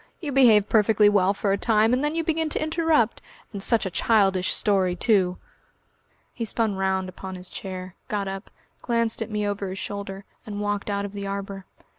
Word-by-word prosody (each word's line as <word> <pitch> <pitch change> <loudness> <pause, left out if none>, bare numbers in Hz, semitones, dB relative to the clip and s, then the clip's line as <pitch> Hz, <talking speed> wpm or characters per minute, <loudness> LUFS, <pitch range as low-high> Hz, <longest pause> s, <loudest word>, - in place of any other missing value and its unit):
You 300 -5 -4
behave 230 -7 +5
perfectly 210 -1 +4
well 195 -2 +3
for 200 0 -1
a 200 - +1
time, 220 0 +3
and 255 +3 +1
then 295 +2 -1
you 330 - 0
begin 320 0 0
to - - 0
interrupt.... 315 -7 +1 0.3
And 200 - -5
such 225 +1 +3
a 190 - -3
childish 195 -1 +2
story, 190 -3 +1
too!" 185 -2 +2 1.0
He 235 - -4
spun 225 -1 0
round 190 -1 0
upon 185 +1 -8
his 180 0 -10
chair, 185 -1 -6
got 205 -2 -2
up, 195 +1 -6 0.3
glanced 230 -1 0
at 225 - -3
me 210 -1 -1
over 200 -1 -3
his 190 - -6
shoulder, 195 0 -6 0.2
and 205 -1 -6
walked 205 0 -2
out 200 0 -1
of 200 - -8
the 200 -1 -5
arbour. 195 -1 -5
205 Hz, 195 wpm, -24 LUFS, 195-225 Hz, 1.0 s, behave